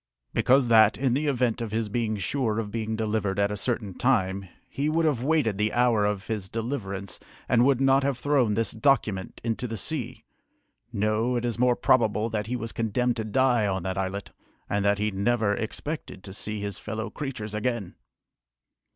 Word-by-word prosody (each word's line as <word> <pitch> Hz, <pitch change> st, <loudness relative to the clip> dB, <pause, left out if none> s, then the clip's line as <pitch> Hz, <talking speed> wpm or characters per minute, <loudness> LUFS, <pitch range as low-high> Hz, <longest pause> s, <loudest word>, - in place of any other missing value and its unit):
"Because 130 Hz, 0 st, +4 dB
that, 110 Hz, -2 st, +6 dB
in 130 Hz, -2 st, +1 dB
the 150 Hz, +4 st, 0 dB
event 125 Hz, -4 st, +1 dB
of 115 Hz, -2 st, -4 dB
his 110 Hz, 0 st, -1 dB
being 110 Hz, 0 st, -1 dB
sure 110 Hz, -, -1 dB
of 110 Hz, -2 st, -3 dB
being 110 Hz, 0 st, -2 dB
delivered 110 Hz, -3 st, -1 dB
at 100 Hz, 0 st, +2 dB
a -, -, -2 dB
certain 105 Hz, -2 st, -2 dB
time, 95 Hz, -6 st, 0 dB, 0.2 s
he 145 Hz, +2 st, -1 dB
would 165 Hz, +1 st, +2 dB
have 145 Hz, -7 st, +1 dB
waited 130 Hz, -8 st, +1 dB
the 105 Hz, +1 st, +2 dB
hour 120 Hz, -4 st, +3 dB
of 105 Hz, -1 st, -1 dB
his 105 Hz, -4 st, -4 dB
deliverance 100 Hz, -5 st, -4 dB, 0.3 s
and 120 Hz, 0 st, +4 dB
would 135 Hz, -2 st, +3 dB
not 135 Hz, 0 st, +4 dB
have 140 Hz, -2 st, 0 dB
thrown 130 Hz, -5 st, +2 dB
this 115 Hz, +1 st, 0 dB
document 110 Hz, -9 st, +1 dB
into 115 Hz, +2 st, -2 dB
the 115 Hz, -1 st, -4 dB
sea. 130 Hz, -, -4 dB, 0.7 s
No, 110 Hz, +3 st, +1 dB
it 120 Hz, 0 st, -1 dB
is 120 Hz, -1 st, -2 dB
more 125 Hz, 0 st, +4 dB
probable 115 Hz, -3 st, +2 dB
that 105 Hz, -1 st, -2 dB
he 125 Hz, -, -2 dB
was 115 Hz, -2 st, -4 dB
condemned 120 Hz, +2 st, 0 dB
to 110 Hz, -, -1 dB
die 120 Hz, 0 st, +2 dB
on 95 Hz, -2 st, -1 dB
that 95 Hz, 0 st, -2 dB
islet, 95 Hz, +1 st, -3 dB, 0.4 s
and 100 Hz, 0 st, 0 dB
that 100 Hz, 0 st, +3 dB
he 105 Hz, +1 st, 0 dB
never 105 Hz, +2 st, +1 dB
expected 110 Hz, -1 st, -5 dB
to 95 Hz, -, -9 dB
see 105 Hz, +1 st, -4 dB
his 100 Hz, -2 st, -4 dB
fellow 110 Hz, +1 st, -5 dB
creatures 125 Hz, -8 st, -5 dB
again!" 105 Hz, -3 st, -2 dB
110 Hz, 190 wpm, -26 LUFS, 105-125 Hz, 0.7 s, that